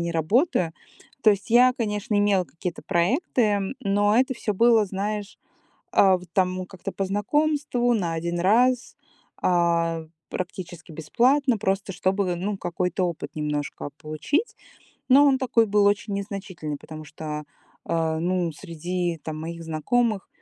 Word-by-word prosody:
не 170 Hz, 0 st, -1 dB
работаю. 170 Hz, -, +1 dB, 0.5 s
То 215 Hz, -, +7 dB
есть 205 Hz, +2 st, -2 dB
я, 250 Hz, +2 st, +6 dB
конечно, 210 Hz, -2 st, -2 dB
имела 200 Hz, -3 st, +3 dB
какие-то 170 Hz, +1 st, -6 dB
проекты, 210 Hz, -, +1 dB, 0.2 s
но 205 Hz, 0 st, +2 dB
это 260 Hz, +1 st, +2 dB
всё 210 Hz, -3 st, -2 dB
было, 230 Hz, +1 st, +5 dB
знаешь, 205 Hz, +1 st, -4 dB, 0.5 s
а, 190 Hz, -2 st, +5 dB
в 180 Hz, -, -13 dB
там 185 Hz, -1 st, 0 dB
как-то 190 Hz, +1 st, -7 dB
по 195 Hz, -, -2 dB
знакомству, 245 Hz, +4 st, +1 dB
на 175 Hz, -7 st, -1 dB
1 170 Hz, +1 st, -2 dB
раз, 240 Hz, +7 st, +2 dB, 0.5 s
а, 170 Hz, -2 st, +1 dB, 0.2 s
практически 180 Hz, -2 st, -6 dB
бесплатно, 250 Hz, -, +2 dB
просто 195 Hz, -1 st, -1 dB
чтобы, 185 Hz, 0 st, 0 dB
ну, 195 Hz, +3 st, -3 dB
какой-то 180 Hz, +1 st, -1 dB
опыт 170 Hz, -3 st, -4 dB
немножко 150 Hz, -1 st, -3 dB
получить. 220 Hz, -, -2 dB, 0.5 s
Но 280 Hz, +2 st, +7 dB
он 270 Hz, -2 st, +4 dB
такой 240 Hz, -3 st, +2 dB
был 205 Hz, 0 st, +3 dB
очень 205 Hz, 0 st, +1 dB
незначительный, 195 Hz, -7 st, -5 dB
потому 155 Hz, 0 st, -10 dB
что, 150 Hz, 0 st, -6 dB, 0.4 s
э, 160 Hz, -1 st, 0 dB
ну, 175 Hz, 0 st, 0 dB
среди 175 Hz, +2 st, -3 dB
там 155 Hz, -1 st, -5 dB
моих 165 Hz, +1 st, -6 dB
знакомых 205 Hz, +7 st, 0 dB
190 Hz, 140 wpm, -25 LUFS, 170-220 Hz, 0.5 s, То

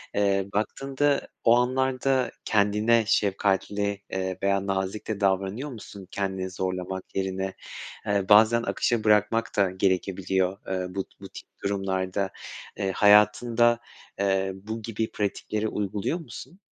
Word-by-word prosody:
Iıı, 100 Hz, -1 st, +1 dB
baktığında 135 Hz, +7 st, 0 dB, 0.2 s
o 115 Hz, -, +6 dB
anlarda, 130 Hz, +1 st, +1 dB
kendine 105 Hz, +2 st, +3 dB
şefkatli, 100 Hz, 0 st, 0 dB
ııı, 95 Hz, -1 st, -2 dB
veya 100 Hz, 0 st, +1 dB
nazik 95 Hz, +2 st, -2 dB
de 110 Hz, -2 st, -3 dB
davranıyor 100 Hz, +8 st, 0 dB
musun 100 Hz, -4 st, -10 dB
kendini 95 Hz, -1 st, -2 dB
zorlamak 95 Hz, 0 st, -4 dB
yerine? 95 Hz, 0 st, -2 dB, 0.5 s
Iıı, 100 Hz, -1 st, 0 dB
bazen 110 Hz, +3 st, +6 dB
akışa 115 Hz, -2 st, 0 dB
bırakmak 105 Hz, +2 st, +2 dB
da 100 Hz, -2 st, +4 dB
gerekebiliyor, 95 Hz, 0 st, 0 dB
ııı, 90 Hz, 0 st, -3 dB
bu 95 Hz, -, -1 dB
ti -, -, -29 dB
bu -, -, -9 dB
tip -, -, -11 dB, 0.2 s
durumlarda, 95 Hz, -1 st, -1 dB, 0.5 s
ııı, 95 Hz, -1 st, 0 dB
hayatında, 115 Hz, +4 st, +4 dB, 0.4 s
ııı, 95 Hz, -1 st, +1 dB
bu 110 Hz, +4 st, -6 dB
gibi 110 Hz, 0 st, -3 dB
pratikleri 105 Hz, +1 st, -2 dB
uyguluyor 105 Hz, -, -2 dB
musun? 150 Hz, -, -10 dB
100 Hz, 125 wpm, -26 LUFS, 95-115 Hz, 0.5 s, o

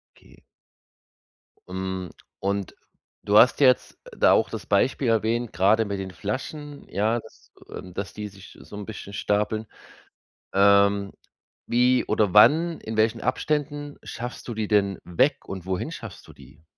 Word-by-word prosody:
Okay. -, -, -21 dB, 1.3 s
Mhm, 95 Hz, -1 st, -4 dB, 0.3 s
und 100 Hz, 0 st, -2 dB, 0.5 s
du 105 Hz, +1 st, +3 dB
hast 125 Hz, -, +6 dB
jetzt 130 Hz, -3 st, +3 dB, 0.2 s
da -, -, +5 dB
auch -, -, +3 dB
das -, -, -6 dB
Beispiel 130 Hz, -1 st, +1 dB
erwähnt, 115 Hz, +1 st, 0 dB
grade 105 Hz, +4 st, +3 dB
mit 100 Hz, -1 st, -4 dB
den 95 Hz, -1 st, -5 dB
Flaschen, 140 Hz, +8 st, -6 dB
ja, 110 Hz, +4 st, 0 dB
dass, 110 Hz, -, -18 dB, 0.2 s
ähm 90 Hz, -1 st, -9 dB
dass 95 Hz, -3 st, -5 dB
die 105 Hz, -1 st, -6 dB
sich 95 Hz, 0 st, -15 dB
so -, -, -12 dB
'n 105 Hz, -, -6 dB
bisschen 105 Hz, -2 st, -8 dB
stapeln. 105 Hz, +2 st, -1 dB, 0.9 s
Ähm, 100 Hz, 0 st, +4 dB, 0.5 s
wie 125 Hz, +1 st, +3 dB
oder 105 Hz, -2 st, +1 dB
wann, 160 Hz, +10 st, +5 dB
in 110 Hz, 0 st, -6 dB
welchen 110 Hz, +1 st, +2 dB
Abständen 145 Hz, +2 st, -2 dB
schaffst 120 Hz, +1 st, -7 dB
du 120 Hz, -, -4 dB
die 110 Hz, -1 st, -3 dB
denn 100 Hz, -3 st, +2 dB
weg 90 Hz, -1 st, +1 dB
und 95 Hz, -2 st, -6 dB
wohin 95 Hz, -, -3 dB
schaffst 115 Hz, -, -9 dB
du -, -, -12 dB
die? 75 Hz, +3 st, -17 dB
105 Hz, 150 wpm, -25 LUFS, 100-120 Hz, 1.3 s, hast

